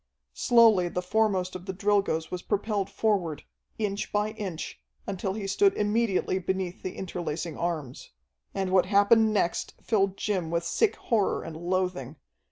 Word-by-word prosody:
Slowly 225 Hz, -7 st, +5 dB
the 180 Hz, +1 st, -3 dB
foremost 190 Hz, -2 st, +1 dB
of 185 Hz, +1 st, -8 dB
the 190 Hz, -, -4 dB
Drilgoes 200 Hz, -5 st, +1 dB
was 180 Hz, -, -4 dB
propelled 205 Hz, -1 st, -1 dB
forward, 180 Hz, -9 st, 0 dB, 0.3 s
inch 205 Hz, -2 st, -2 dB
by 210 Hz, +1 st, 0 dB
inch, 190 Hz, -, -6 dB, 0.2 s
until 190 Hz, 0 st, -3 dB
he 205 Hz, -1 st, -5 dB
stood 390 Hz, -, +3 dB
immediately 210 Hz, -3 st, +1 dB
beneath 185 Hz, 0 st, -3 dB
the 185 Hz, -, -5 dB
interlacing 170 Hz, -3 st, -4 dB
arms. 155 Hz, -7 st, -4 dB, 0.4 s
And 190 Hz, -1 st, -2 dB
what 185 Hz, -1 st, +4 dB
happened 215 Hz, +2 st, +5 dB
next 185 Hz, -5 st, -1 dB
filled 195 Hz, -3 st, +1 dB
Jim 185 Hz, -6 st, -1 dB
with 170 Hz, +1 st, 0 dB
sick 400 Hz, -, +1 dB
horror 215 Hz, -4 st, 0 dB
and 160 Hz, -, -7 dB
loathing. 175 Hz, -5 st, -2 dB
190 Hz, 150 wpm, -27 LUFS, 175-210 Hz, 0.4 s, Slowly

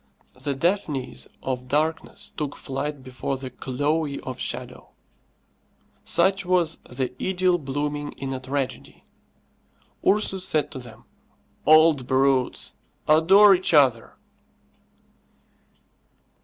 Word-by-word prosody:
The 140 Hz, -1 st, -4 dB
Daphnis 155 Hz, -4 st, -2 dB, 0.2 s
of 125 Hz, -1 st, -3 dB
darkness 155 Hz, +4 st, -2 dB
took 150 Hz, -2 st, -4 dB
flight 140 Hz, 0 st, -5 dB
before 130 Hz, +1 st, -4 dB
the 130 Hz, -1 st, -7 dB
Chloe 145 Hz, +4 st, -2 dB
of 130 Hz, -1 st, -7 dB
shadow. -, -, -5 dB, 1.1 s
Such 195 Hz, 0 st, +2 dB
was 180 Hz, -3 st, +1 dB
the 125 Hz, 0 st, -3 dB
idyll 185 Hz, -1 st, +1 dB
blooming 145 Hz, +1 st, -3 dB
in 135 Hz, 0 st, -5 dB
a 130 Hz, -, -4 dB
tragedy. 135 Hz, 0 st, -4 dB, 1.0 s
Ursus 195 Hz, -2 st, +1 dB
said 155 Hz, -5 st, 0 dB
to -, -, -6 dB
them, 120 Hz, -3 st, -13 dB, 0.6 s
"Old 155 Hz, -4 st, +5 dB
brutes, 130 Hz, -1 st, +1 dB, 0.3 s
adore 190 Hz, +7 st, +7 dB
each 180 Hz, -3 st, +2 dB
other!" 130 Hz, -6 st, +3 dB
145 Hz, 100 wpm, -24 LUFS, 130-165 Hz, 1.1 s, adore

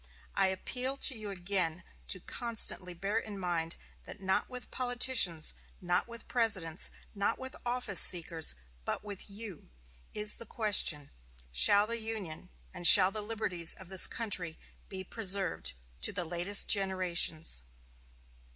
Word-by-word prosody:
I -, -, +1 dB
appeal 250 Hz, +8 st, -3 dB
to 270 Hz, -, +1 dB
you 215 Hz, -2 st, -7 dB
again 180 Hz, -3 st, -1 dB, 0.2 s
to 185 Hz, -, 0 dB
constantly 200 Hz, -4 st, +2 dB
bear 200 Hz, +5 st, -3 dB
in 210 Hz, -3 st, -9 dB
mind 170 Hz, -3 st, -4 dB, 0.3 s
that -, -, -9 dB
not 190 Hz, 0 st, -2 dB
with 250 Hz, -1 st, -8 dB
politicians, 245 Hz, -10 st, +2 dB, 0.3 s
not 180 Hz, +3 st, -2 dB
with 235 Hz, -1 st, -11 dB
Presidents, 195 Hz, -9 st, 0 dB, 0.2 s
not 200 Hz, +2 st, -2 dB
with 260 Hz, 0 st, -9 dB
office 240 Hz, -5 st, 0 dB
seekers, 165 Hz, -, +6 dB, 0.3 s
but -, -, -5 dB
with 205 Hz, -1 st, -7 dB
you, 200 Hz, -4 st, -10 dB, 0.5 s
is 210 Hz, 0 st, 0 dB
the 230 Hz, -, -10 dB
question, 190 Hz, -10 st, +2 dB, 0.4 s
Shall 200 Hz, -, +4 dB
the 230 Hz, +1 st, -3 dB
Union 215 Hz, -8 st, -7 dB, 0.2 s
and 175 Hz, -, +1 dB
shall 190 Hz, -1 st, +9 dB
the 215 Hz, -, -5 dB
liberties 205 Hz, -6 st, -3 dB
of 190 Hz, -2 st, -14 dB
this 190 Hz, -1 st, +6 dB
country 185 Hz, -8 st, -3 dB, 0.3 s
be 190 Hz, -1 st, -8 dB
preserved 195 Hz, -3 st, -1 dB, 0.3 s
to -, -, +3 dB
the 180 Hz, -, -4 dB
latest 175 Hz, +4 st, +1 dB
generations?" 180 Hz, -, -1 dB
195 Hz, 140 wpm, -30 LUFS, 175-220 Hz, 0.5 s, shall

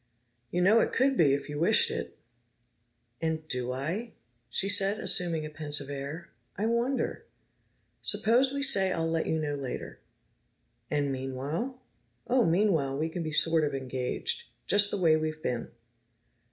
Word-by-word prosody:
"You 180 Hz, 0 st, 0 dB
know 215 Hz, +5 st, +5 dB
it -, -, 0 dB
could 270 Hz, +2 st, +2 dB
be, 145 Hz, -, +4 dB
if 140 Hz, -, -6 dB
you 145 Hz, 0 st, -5 dB
wished 170 Hz, -, +4 dB
it!" -, -, -6 dB, 1.0 s
"And 160 Hz, -1 st, -2 dB
do 125 Hz, -3 st, -1 dB
I?" 170 Hz, -, -4 dB, 0.4 s
she 190 Hz, +11 st, -1 dB
said, 200 Hz, +1 st, +2 dB
assuming 170 Hz, -6 st, +4 dB
a -, -, -6 dB
pensive 145 Hz, -2 st, -3 dB
air. 140 Hz, +5 st, -7 dB, 0.3 s
"I 205 Hz, -, -1 dB
wonder. 235 Hz, +4 st, -1 dB, 0.7 s
Suppose 230 Hz, +6 st, +2 dB
we 280 Hz, 0 st, -2 dB
say 195 Hz, -9 st, +5 dB
I'll 165 Hz, -2 st, -1 dB
let 165 Hz, 0 st, -1 dB
you 160 Hz, -, 0 dB
know 150 Hz, -2 st, -2 dB
later." 140 Hz, -3 st, -6 dB, 0.9 s
"And 145 Hz, -2 st, 0 dB
meanwhile?" 140 Hz, -, -4 dB, 0.4 s
"Oh, 245 Hz, -7 st, +2 dB
meanwhile 165 Hz, -7 st, +1 dB
we 160 Hz, +2 st, -1 dB
can 170 Hz, +2 st, -5 dB
be 155 Hz, -1 st, -4 dB
sort 160 Hz, +1 st, +4 dB
of 145 Hz, -2 st, -1 dB
engaged. 135 Hz, -, -3 dB, 0.2 s
Just 205 Hz, 0 st, +4 dB
the 205 Hz, -, -2 dB
way 165 Hz, -3 st, +4 dB
we've 155 Hz, 0 st, -4 dB
been." 120 Hz, -1 st, -3 dB
165 Hz, 155 wpm, -28 LUFS, 145-205 Hz, 1.0 s, know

